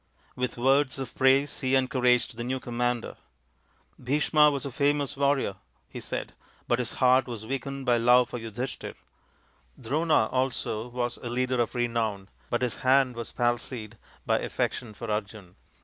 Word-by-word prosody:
With 125 -1 -3
words 135 +3 +2
of 135 -3 -6
praise 135 +2 +3
he 130 -1 +1
encouraged 125 -3 +2
the 120 - -5
new 130 +2 -2
commander. 120 -1 -2 0.4
" - - -38
Bhisma 150 +3 +4
was 140 -2 -3
a 140 - -4
famous 145 +2 +1
warrior," 140 -8 +1 0.3
he - - -8
said, - - -5 0.2
" - - -32
but 120 - +2
his 120 -1 -2
heart 130 0 +4
was 115 -3 -6
weakened 135 +2 -4
by 120 -2 +4
love 125 +1 +5
for 120 - -4
Yudhishthir. 115 +3 -5 0.8
Drona 150 +2 +2
also 125 -3 -1
was 120 0 -3
a 120 - -6
leader 125 +1 0
of 120 - -2
renown, 115 -5 -1 0.2
but 120 +1 0
his 125 - -1
hand 130 -1 +3
was 115 -1 -6
palsied 120 -2 -2 0.3
by - - +2
affection 110 -4 -3
for 115 +1 -5
Arjun. 100 -3 -5
125 Hz, 165 wpm, -27 LUFS, 120-135 Hz, 0.8 s, love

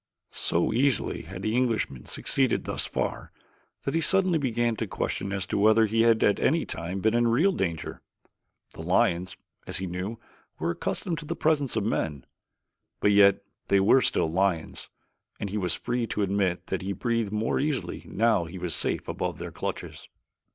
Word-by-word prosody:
So 85 - 0
easily 130 0 +1
had 95 +3 -9
the 110 +1 0
Englishman 115 - 0
succeeded 130 -3 +1
thus - - -2
far - - -3 0.5
that 135 - -2
he 165 - +1
suddenly 185 +1 +3
began 120 -3 0
to 110 - -2
question 100 +1 -3
as 95 -1 -2
to 95 - -2
whether 110 +2 +5
he 110 +1 +1
had 115 -1 +4
at 100 - +3
any 165 +4 +2
time 85 +4 -5
been 110 +2 +2
in 120 0 +3
real 145 +13 +3
danger. 85 - -3 0.7
The - - -9
lions, 90 +1 +1 0.3
as - - -2
he 95 - -3
knew, 90 +5 -4 0.4
were 85 +2 -1
accustomed 165 - -3
to 160 - -8
the 165 - -3
presence 150 -4 +1
of - - 0
men, 75 - -2 0.7
but 105 - +3
yet 100 -1 +5 0.2
they 100 - +4
were 110 +7 +5
still 80 - +1
lions 90 -2 -1 0.5
and 100 - -4
he 105 - -2
was 90 -3 -1
free 120 -1 -2
to 105 - -1
admit 95 -2 0
that 95 - -3
he 95 +1 -3
breathed 115 0 -1
more 105 +1 0
easily 145 -1 -2
now 110 -4 +2
that - - -10
he 95 - -8
was 90 -2 -3
safe - - -2
above - - -3
their - - -6
clutches. - - -6
105 Hz, 185 wpm, -27 LUFS, 95-120 Hz, 0.7 s, whether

